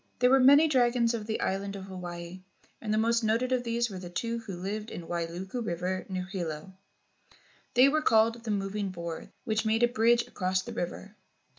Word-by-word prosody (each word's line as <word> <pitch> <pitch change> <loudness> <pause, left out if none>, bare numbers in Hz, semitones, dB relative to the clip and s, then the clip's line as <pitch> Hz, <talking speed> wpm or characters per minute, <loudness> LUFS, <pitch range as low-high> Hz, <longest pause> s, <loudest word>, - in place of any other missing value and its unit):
There 250 +1 +4
were 270 - +6
many 285 +5 +7
dragons 245 -4 +3
of 220 -2 -4
the 220 - -2
island 195 +1 -2
of 195 - -7
Hawaii, 180 -1 -7 0.4
and 215 - -3
the 215 - +2
most 230 +1 +2
noted 230 +4 +1
of 255 -1 +1
these 235 0 0
were 195 -4 -7
the 180 -1 -8
two 230 +6 -2
who 215 -5 -7
lived 210 +4 -4
in - - -6
the - - -12
Wailuku 175 +7 -4
River 180 0 -3
near 185 -1 -3
Hilo. 180 -2 -5 1.0
They 250 +2 +7
w'ere 305 +3 +3
called 225 0 +3
"the 230 - -6
moving 200 0 -1
boards" 170 -3 -6
which 220 -3 0
made 225 +1 +1
a - - +7
bridge 235 0 +3
across 185 0 -1
the - - -7
river. 195 +4 -5
215 Hz, 200 wpm, -29 LUFS, 185-235 Hz, 1.0 s, many